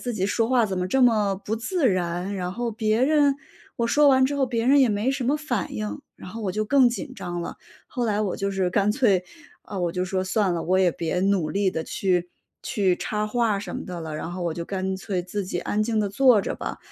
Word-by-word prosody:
自 245 Hz, -2 st, -3 dB
己 190 Hz, -2 st, -1 dB
说 225 Hz, +2 st, 0 dB
话 250 Hz, -3 st, +3 dB
怎 190 Hz, -3 st, -2 dB
么 180 Hz, -, -1 dB
这 260 Hz, +7 st, +2 dB
么 215 Hz, -5 st, +3 dB
不 220 Hz, +2 st, -1 dB
自 285 Hz, -, 0 dB
然， 180 Hz, +1 st, -1 dB
然 180 Hz, 0 st, -3 dB
后 240 Hz, +2 st, -2 dB
别 220 Hz, +2 st, 0 dB
人 290 Hz, -1 st, +4 dB, 0.4 s
我 235 Hz, -, 0 dB
说 295 Hz, +3 st, +4 dB
完 260 Hz, -1 st, +5 dB
之 285 Hz, +2 st, 0 dB
后 270 Hz, -2 st, +2 dB
别 230 Hz, -2 st, -1 dB
人 280 Hz, +3 st, +5 dB
也 255 Hz, -, +5 dB
没 210 Hz, +5 st, 0 dB
什 270 Hz, -2 st, -2 dB
么 285 Hz, +4 st, +2 dB
反 250 Hz, -, -3 dB
应， 105 Hz, -1 st, -4 dB, 0.2 s
然 180 Hz, -, -10 dB
后 225 Hz, -, -7 dB
我 190 Hz, -3 st, -2 dB
就 215 Hz, 0 st, -1 dB
更 260 Hz, +2 st, +5 dB
紧 260 Hz, +3 st, -5 dB
张 175 Hz, -6 st, -5 dB
了。 -, -, -6 dB, 0.3 s
后 245 Hz, -3 st, -3 dB
来 210 Hz, -1 st, 0 dB
我 195 Hz, -, -2 dB
就 200 Hz, 0 st, -2 dB
是 190 Hz, -2 st, 0 dB
干 200 Hz, +2 st, +2 dB
脆 205 Hz, -6 st, +2 dB, 0.4 s
啊， 200 Hz, -, -7 dB
我 175 Hz, -2 st, -1 dB
就 180 Hz, -, -1 dB
说： 185 Hz, 0 st, -2 dB
“算 190 Hz, -1 st, +1 dB
了， 165 Hz, -, -2 dB
我 185 Hz, +2 st, +2 dB
也 180 Hz, -2 st, +4 dB
别 170 Hz, +2 st, -2 dB
努 190 Hz, -5 st, +1 dB
力 195 Hz, -1 st, +1 dB
地 160 Hz, -2 st, -3 dB
去 180 Hz, -2 st, -1 dB, 0.3 s
去 195 Hz, -7 st, +1 dB
插 210 Hz, 0 st, -2 dB
话 220 Hz, -2 st, +1 dB
什 205 Hz, -, -6 dB
么 -, -, -6 dB
的 180 Hz, -3 st, -6 dB
了。” 160 Hz, -1 st, -6 dB
然 165 Hz, -, -5 dB
后 180 Hz, -, -5 dB
我 170 Hz, -2 st, -1 dB
就 170 Hz, -, -4 dB
干 190 Hz, 0 st, -3 dB
脆 190 Hz, -2 st, -3 dB
自 195 Hz, +2 st, -4 dB
己 180 Hz, -1 st, -3 dB
安 210 Hz, +4 st, -1 dB
静 220 Hz, -1 st, 0 dB
地 205 Hz, -, 0 dB
坐 240 Hz, +1 st, +5 dB
着 -, -, -3 dB
吧。 -, -, -5 dB
205 Hz, 275 characters per minute, -24 LUFS, 180-240 Hz, 0.4 s, 完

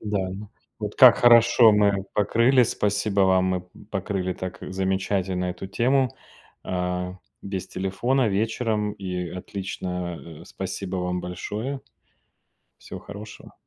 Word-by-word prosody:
Да, 100 Hz, -3 st, -2 dB
но 100 Hz, +2 st, -8 dB, 0.3 s
Вот, 105 Hz, -1 st, -4 dB
как 130 Hz, -3 st, +8 dB
хорошо 120 Hz, -1 st, +7 dB
мы 100 Hz, -2 st, +2 dB
покрыли 115 Hz, +5 st, +4 dB
спасибо 105 Hz, -2 st, +1 dB
вам, 95 Hz, -1 st, +4 dB
мы 95 Hz, -1 st, 0 dB
п 90 Hz, -, -26 dB, 0.2 s
покрыли 95 Hz, -1 st, -2 dB
так 95 Hz, 0 st, -6 dB
замечательно 95 Hz, -1 st, -1 dB
эту 90 Hz, +1 st, -5 dB
тему. 125 Hz, +6 st, +2 dB, 0.5 s
А, 90 Hz, 0 st, -2 dB, 0.3 s
без 95 Hz, -2 st, -4 dB
телефона 115 Hz, +7 st, 0 dB
вечером- 105 Hz, 0 st, -1 dB
и 90 Hz, -2 st, -4 dB
отлично. 90 Hz, -3 st, -6 dB
А, -, -, -13 dB
спасибо 95 Hz, -1 st, -5 dB
вам 90 Hz, 0 st, -2 dB
большое. 110 Hz, +9 st, -5 dB, 1.0 s
Всего -, -, -9 dB
хорошего. 105 Hz, +1 st, -11 dB
95 Hz, 125 wpm, -24 LUFS, 90-110 Hz, 1.0 s, как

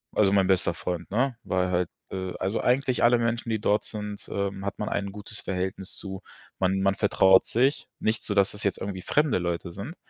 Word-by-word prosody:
Also, 100 Hz, -2 st, +4 dB
mein 95 Hz, -1 st, +4 dB
bester 90 Hz, -2 st, +2 dB
Freund, 90 Hz, 0 st, -4 dB
ne, 125 Hz, +2 st, +1 dB
weil 90 Hz, 0 st, 0 dB
halt, 90 Hz, -1 st, +1 dB, 0.2 s
äh, 95 Hz, -1 st, -3 dB
also, 95 Hz, +4 st, 0 dB
eigentlich 125 Hz, -1 st, +2 dB
alle 120 Hz, 0 st, +6 dB
Menschen, 115 Hz, 0 st, -1 dB
die 110 Hz, -2 st, 0 dB
dort 105 Hz, 0 st, +2 dB
sind, 105 Hz, -1 st, -7 dB
ähm, 100 Hz, 0 st, -3 dB
hat -, -, -3 dB
man 105 Hz, -, -1 dB
ein 100 Hz, -1 st, -2 dB
gutes 105 Hz, +1 st, -8 dB
Verhältnis 95 Hz, +1 st, -3 dB
zu, 95 Hz, -1 st, -7 dB, 0.4 s
man 95 Hz, +1 st, +1 dB
man 100 Hz, 0 st, +2 dB
vertraut 95 Hz, -2 st, +5 dB
sich- 130 Hz, +5 st, +1 dB
nicht 110 Hz, +1 st, 0 dB
so, 105 Hz, -, -2 dB
dass 100 Hz, -1 st, +4 dB
das 105 Hz, 0 st, -9 dB
jetzt 100 Hz, -, 0 dB
irgendwie 95 Hz, -2 st, -5 dB
fremde 150 Hz, -8 st, +2 dB
Leute 85 Hz, 0 st, -2 dB
sind- 100 Hz, -, -7 dB
100 Hz, 210 wpm, -27 LUFS, 95-110 Hz, 0.4 s, alle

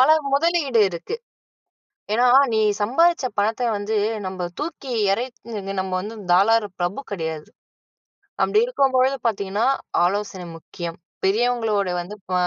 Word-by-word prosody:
பல 260 Hz, -, +6 dB, 0.3 s
முதலீடு 295 Hz, -6 st, +2 dB
இருக்கு. 170 Hz, -, -5 dB, 1.0 s
ஏன்னா 245 Hz, +2 st, +4 dB, 0.3 s
நீ -, -, +2 dB, 0.2 s
சம்பாதிச்ச 330 Hz, +5 st, +3 dB
பணத்தை 225 Hz, +4 st, +1 dB
வந்து, 205 Hz, +2 st, -3 dB, 0.3 s
நம்ப 185 Hz, -1 st, -3 dB
தூக்கி 295 Hz, -4 st, -5 dB, 0.2 s
எறைச் 245 Hz, +3 st, -5 dB, 0.2 s
நின்னு 195 Hz, -1 st, -4 dB
நம்ம 190 Hz, 0 st, -4 dB
வந்து 215 Hz, +3 st, -7 dB, 0.2 s
தாராள 210 Hz, +4 st, +4 dB
பிரபு 175 Hz, +10 st, -1 dB
கெடையாது. 160 Hz, -4 st, -4 dB, 1.0 s
அப்டி 425 Hz, -, +3 dB
இருக்கும் 275 Hz, -, +1 dB
பொழுது 265 Hz, +2 st, +3 dB
பார்த்தீங்கன்னா, 200 Hz, +1 st, -1 dB, 0.4 s
ஆலோசனை 195 Hz, -1 st, -2 dB
முக்கியம். 170 Hz, +1 st, -7 dB, 0.3 s
பெரியவங்களோட 220 Hz, -1 st, +1 dB
வந்து 200 Hz, +4 st, -8 dB, 0.2 s
ப -, -, -1 dB
220 Hz, 125 wpm, -22 LUFS, 190-260 Hz, 1.0 s, பல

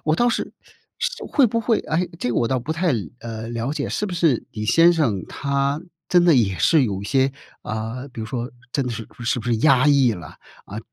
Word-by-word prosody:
我 155 Hz, 0 st, +2 dB
倒 240 Hz, -, +3 dB
是 -, -, -2 dB, 0.5 s
是 -, -, -3 dB
会 275 Hz, -5 st, +3 dB
不 230 Hz, +1 st, 0 dB
会 225 Hz, 0 st, +1 dB
诶， 170 Hz, +3 st, -1 dB
这 125 Hz, -, -1 dB
个 -, -, -2 dB
我 115 Hz, -, +2 dB
倒 130 Hz, -2 st, 0 dB
不 155 Hz, +7 st, -3 dB
太， 170 Hz, -1 st, +1 dB, 0.3 s
呃， 115 Hz, 0 st, -6 dB
了 120 Hz, +4 st, -2 dB
解。 -, -, -3 dB
是 210 Hz, -, -2 dB
不 180 Hz, -, -4 dB
是 165 Hz, -8 st, +2 dB
你 105 Hz, -1 st, -4 dB
先 165 Hz, +9 st, +5 dB
生 115 Hz, -, 0 dB
他 140 Hz, +2 st, -1 dB, 0.3 s
真 175 Hz, -1 st, +4 dB
的 175 Hz, -, +6 dB
也 100 Hz, -7 st, +2 dB
是 150 Hz, -, +4 dB
有 100 Hz, -4 st, -3 dB
一 -, -, -7 dB
些， 135 Hz, +4 st, +2 dB, 0.3 s
啊， 115 Hz, +4 st, -4 dB
比 115 Hz, -, -7 dB
如 110 Hz, -, -4 dB
说 120 Hz, +1 st, -4 dB, 0.2 s
真 140 Hz, -3 st, 0 dB
的 125 Hz, -, -2 dB
是 115 Hz, -1 st, -7 dB, 0.2 s
是 120 Hz, 0 st, 0 dB
不 110 Hz, -, -9 dB
是 120 Hz, -2 st, +2 dB
压 135 Hz, +1 st, +4 dB
抑 135 Hz, -4 st, +4 dB
了？ 85 Hz, -7 st, -9 dB, 0.3 s
啊， 105 Hz, +2 st, -7 dB
130 Hz, 245 characters per minute, -22 LUFS, 115-160 Hz, 0.5 s, 的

